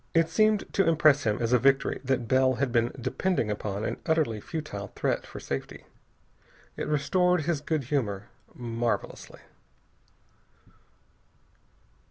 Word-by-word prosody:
It 165 -1 +4
seemed 215 +3 +3
to 195 -4 +3
impress 150 -3 +4
him 105 -1 +1
as 115 0 0
a 125 - +5
victory 135 +2 +2
that 130 -3 -1
Bell 130 +1 +3
had 130 0 -1
been 120 0 +2
depending 130 - -1
upon 105 0 -3
an - - -2
utterly 150 -10 +1
futile 125 - -5
threat - - -1
for - - -9
safety. 70 - -6 0.9
It - - -4
restored 180 +4 +2
his 155 -1 -1
good 155 -1 -1
humor 110 -7 -2 0.3
marvelously. 120 -1 -3
135 Hz, 130 wpm, -27 LUFS, 115-160 Hz, 0.9 s, a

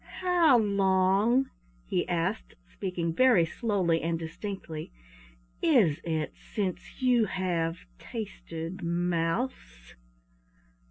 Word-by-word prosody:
"How 350 -7 +5
long," 200 +4 +3 0.3
he - - -1
asked, 165 - -2 0.2
speaking 175 -3 -2
very 235 -5 +5
slowly 180 -3 0
and 165 +1 -1
distinctly, 165 -1 -6 0.7
"is 190 - +4
it 160 -2 -2
since 200 +5 -5
you 245 -3 +4
have 175 -4 -1 0.2
tasted 185 -5 -6
mouse?" 170 - -2
185 Hz, 90 wpm, -29 LUFS, 165-220 Hz, 0.7 s, How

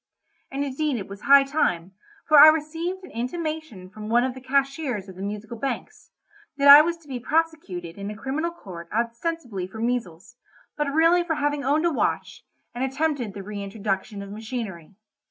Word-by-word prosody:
And 275 +1 -2
indeed 280 0 -1
it 195 - -6
was 200 +1 -10
high 280 0 +7
time, 195 - -1 0.4
for 305 -2 +7
I 305 - +12
received 325 +4 0
an - - -11
intimation 305 - -4
from 210 +3 -9
one 240 +2 +4
of 260 0 -1
the 260 - -11
cashiers 270 -5 -1
of 190 - -11
the 185 - -9
Musical 210 +3 -5
Banks, 275 - -5 0.5
that 280 0 +3
I 285 +1 +12
was 340 +2 -1
to - - -21
be 260 -3 -5
prosecuted 240 - -2
in 200 +1 -5
a 210 - -7
criminal 285 +8 -2
court 175 - -10
ostensibly 235 - -3
for 220 +4 -10
measles, 230 -3 -3 0.4
but 295 -1 -1
really 330 +3 +4
for 330 -2 -1
having 290 -1 -1
owned 295 +4 +2
a 340 - +3
watch, - - -2 0.3
and 245 - -3
attempted 270 -5 -1
the 200 - -6
reintroduction 200 0 -4
of 200 - -10
machinery. 210 -6 -6
255 Hz, 180 wpm, -24 LUFS, 205-305 Hz, 0.5 s, I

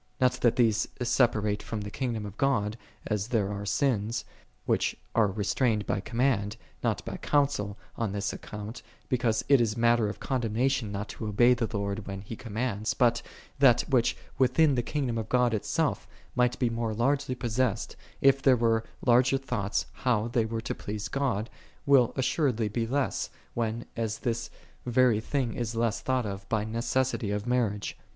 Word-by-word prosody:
Not 130 -1 +4
that 120 -1 +4
these 110 -3 +3
sepa 120 -3 +2
rate 105 -1 -1
from 110 -2 -4
the 105 0 -6
kingdom 115 -5 -2
of 100 -1 -8
God, 110 -5 +1 0.3
as 105 -1 -1
there 105 -5 0
are 100 0 -5
sins, 115 -4 0 0.4
which - - +1 0.2
are 115 -2 +4
restrained 105 +2 0
by - - 0
command, 115 -1 0 0.3
not - - 0
by - - -5
counsel, 140 -9 0 0.2
on 115 -4 -1
this 100 0 -2
account, 105 +3 -7 0.3
because 120 -3 +1
it 140 -3 +6
is 110 -1 0
matter 115 -2 +3
of 105 - -7
condemnation 125 -1 0
not 100 +1 -4
to 110 - -5
obey 120 +4 +5
the 120 -2 -1
Lord 100 0 -3
when 95 -1 -5
He 105 +3 -7
commands: 110 -1 -2
but 120 -1 +3 0.4
that, 125 -4 +6
which, 125 -4 +2 0.2
within 135 +4 +4
the 125 - +1
kingdom 125 -3 -2
of 110 - -5
God 125 -2 +3
itself, 105 - -1 0.3
might 125 0 +2
be 120 -3 +1
more 115 -1 -2
largely 135 +3 +1
possessed, 120 -2 -1 0.3
if 135 0 +5
there 135 -2 +5
were 115 -1 +2 0.2
larger 125 +2 +5
thoughts 120 -7 -2
how 120 -3 0
they 115 -2 +1
were 115 0 -3
to 115 - -3
please 105 0 -5
God, 125 -6 -1 0.4
will 135 -4 +5
assuredly 130 -5 +1
be 115 +2 -1
less, 135 +3 -1 0.2
when 115 0 -2
as 110 -2 -2
this 115 -2 -2 0.3
very 125 -2 +3
thing 125 0 -1
is 115 -1 -3
less 115 -1 0
thought 130 -2 0
of 100 -1 -6
by 110 -2 +1
necessity 115 +1 -1
of 105 +1 -2
marriage. 115 -5 0
115 Hz, 175 wpm, -28 LUFS, 105-125 Hz, 0.4 s, it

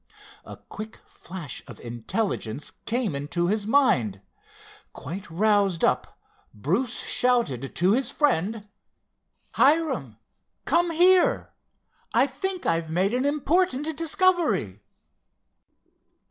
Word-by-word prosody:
A - - -10
quick 215 +1 -9
flash 170 -8 -9
of - - -11
intelligence 120 - -3 0.2
came 235 - 0
into 145 +5 -2
his 205 +3 -1
mind. 130 - +2 0.7
Quite 195 +3 -7
roused 200 0 +2
up, - - 0 0.4
Bruce 185 - -1
shouted 235 - 0
to 180 +3 +3
his 250 +3 +1
friend: 225 - 0 0.8
"Hiram, 270 - +2 0.5
come 340 +5 +2
here, 360 +2 +3 0.6
I 245 +3 +5
think 360 +7 -4
I've 165 -1 0
made 185 +6 +1
an 255 +2 0
important 300 +1 +1
discovery!" 330 - +2
220 Hz, 100 wpm, -25 LUFS, -, 0.8 s, I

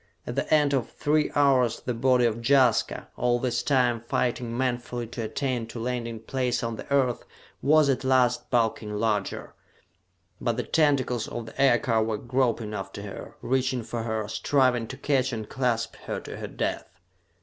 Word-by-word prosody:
At - - -4
the - - -2
end 150 -2 +4
of 130 -4 0
three 150 0 +1
hours 130 -5 +3
the 125 - -2
body 125 +1 +3
of 115 0 0
Jaska, 125 -3 +3
all 120 0 +2
this 120 -1 -1
time 125 -4 +2
fighting 120 0 -1
manfully 125 -1 -2
to 115 +1 -6
attain 120 +1 -2
to 115 - -7
landing 115 -2 -3
place 125 0 -1
on 115 -1 -2
the 110 - -10
Earth, 130 -4 +2 0.4
was 155 +1 +5
at 135 -1 +1
last 130 -2 +2
bulking 110 -3 0
larger; 105 -2 -1 0.9
but - - 0
the - - -1
tentacles 140 -7 +1
of 120 - -5
the 110 - -5
aircar 120 -4 +3
were 110 -1 -1
groping 120 -2 0
after 95 0 -6
her, 100 - -8
reaching 130 -1 0
for 115 +1 -4
her, 110 -2 -2
striving 120 +2 +1
to 130 - -8
catch 135 -2 +1
and 110 -3 -5
clasp 120 -3 -1
her - - -2
to - - -8
her - - -5
death. 90 - -4
120 Hz, 170 wpm, -26 LUFS, 115-130 Hz, 0.9 s, was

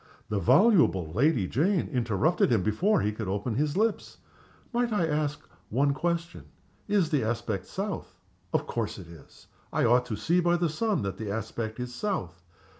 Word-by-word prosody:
The 105 - 0
voluble 130 - +4
Lady 120 - +2
Jane 170 - +1
interrupted 125 - +1
him 110 -6 +3
before 180 - +2
he 105 - 0
could 110 -1 -5
open 100 +5 -2
his 150 - 0
lips. 220 +1 0 0.6
"Might 240 0 +1
I 205 -6 +2
ask 150 -1 -2 0.2
one 140 +5 +2
question? 170 +2 -3 0.4
Is 200 -6 +2
the 145 -6 +2
aspect 110 -4 -2
south? 200 +1 -5 0.3
Of - - 0
course 115 -3 -3
it 95 - -9
is! 85 -2 -15 0.3
I - - +1
ought 125 +1 +3
to 110 - -3
see 165 - +1
by 175 0 +3
the 170 -1 +1
sun 195 - 0
that 95 -1 -3
the 110 -2 -5
aspect 110 +2 -4
is 125 0 -5
south. 95 - -3
130 Hz, 175 wpm, -28 LUFS, 110-175 Hz, 0.6 s, voluble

